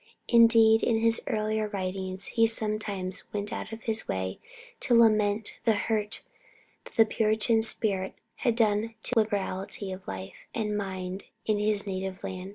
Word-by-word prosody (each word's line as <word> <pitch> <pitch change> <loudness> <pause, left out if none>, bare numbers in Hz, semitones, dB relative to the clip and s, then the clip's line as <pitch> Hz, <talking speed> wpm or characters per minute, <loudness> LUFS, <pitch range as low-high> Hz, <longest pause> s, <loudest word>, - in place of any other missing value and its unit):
Indeed, 230 -1 +6
in 230 - +2
his 230 0 +3
earlier 215 0 -1
writings 190 -1 -4
he 225 -1 +3
sometimes 210 -4 0
went 205 0 -3
out - - -5
of 225 0 -8
his 220 -1 -1
way 95 0 -3 0.4
to 245 - +2
lament 215 -2 +2
the 225 - +3
hurt 210 0 -1 0.6
that - - -14
the 225 - +6
Puritan 220 +1 +2
spirit 205 -3 -1 0.2
had 240 -4 +1
done 225 0 +1
to - - +3
liberality 200 -2 -2
of 185 0 -9
life 95 0 -8
and 210 -2 -1
mind 190 -1 -4 0.2
in 215 -1 +1
his 210 -1 +1
native 190 -1 -4
land. 185 0 -5
210 Hz, 155 wpm, -28 LUFS, 190-225 Hz, 0.6 s, Indeed